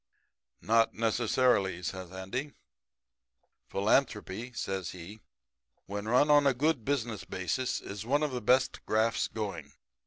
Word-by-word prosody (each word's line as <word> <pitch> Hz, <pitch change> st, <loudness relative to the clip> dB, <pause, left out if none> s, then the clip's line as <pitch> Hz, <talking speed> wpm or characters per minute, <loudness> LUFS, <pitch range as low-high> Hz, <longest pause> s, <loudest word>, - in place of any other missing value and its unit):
"'Not 115 Hz, +1 st, +3 dB
necessarily,' 115 Hz, -5 st, +1 dB
says 95 Hz, +1 st, -5 dB
Andy. 95 Hz, +10 st, -5 dB, 1.1 s
'Philanthropy,' 110 Hz, +1 st, 0 dB
says 95 Hz, -6 st, -3 dB
he, 90 Hz, +5 st, -10 dB, 0.6 s
'when 100 Hz, +1 st, -5 dB
run 130 Hz, +6 st, +4 dB
on 145 Hz, -1 st, +6 dB
a 135 Hz, -, +3 dB
good 145 Hz, -1 st, +1 dB
business 120 Hz, -6 st, -2 dB
basis 95 Hz, +7 st, -2 dB
is 100 Hz, +1 st, -7 dB
one 145 Hz, +6 st, +1 dB
of 150 Hz, -, 0 dB
the 125 Hz, -1 st, -3 dB
best 130 Hz, +4 st, +2 dB
grafts 110 Hz, +1 st, +2 dB
going. 85 Hz, -10 st, -5 dB
110 Hz, 125 wpm, -30 LUFS, 95-130 Hz, 1.1 s, on